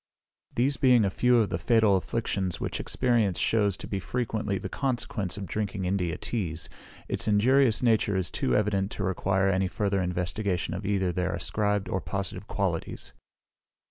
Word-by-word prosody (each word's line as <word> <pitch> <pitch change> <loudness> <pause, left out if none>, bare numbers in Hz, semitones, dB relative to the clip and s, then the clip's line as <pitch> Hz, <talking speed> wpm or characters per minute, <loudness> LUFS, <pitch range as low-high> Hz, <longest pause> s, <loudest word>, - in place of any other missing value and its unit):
These 130 +3 +1
being 125 -4 +5
a 95 - 0
few 125 +4 +3
of 110 -3 +2
the - - -2
fatal 110 -4 +4
afflictions 95 -2 -2
which - - -3
experience 115 -8 +1
shews 105 -4 +2
to - - -8
be 100 - -2
frequently 110 -2 -2
the - - -5
consequence 120 -8 -2
of 100 - -4
drinking 100 +1 -3
India 90 -3 -1
teas, 85 -9 -3 0.4
its - - -1
injurious 120 +4 +4
nature 110 -4 +3
is 90 -3 -1
too 65 - 0
evident 100 -2 +1
to 95 - -4
require 95 +1 +1
any 95 0 +1
further 100 +1 0
investigation 90 +1 -2
of 95 +2 -4
either 95 -3 +1
their 90 0 -1
ascribed 105 -2 -1
or 95 - -1
positive 100 -2 -4
qualities. - - -3
100 Hz, 165 wpm, -27 LUFS, 95-110 Hz, 0.4 s, being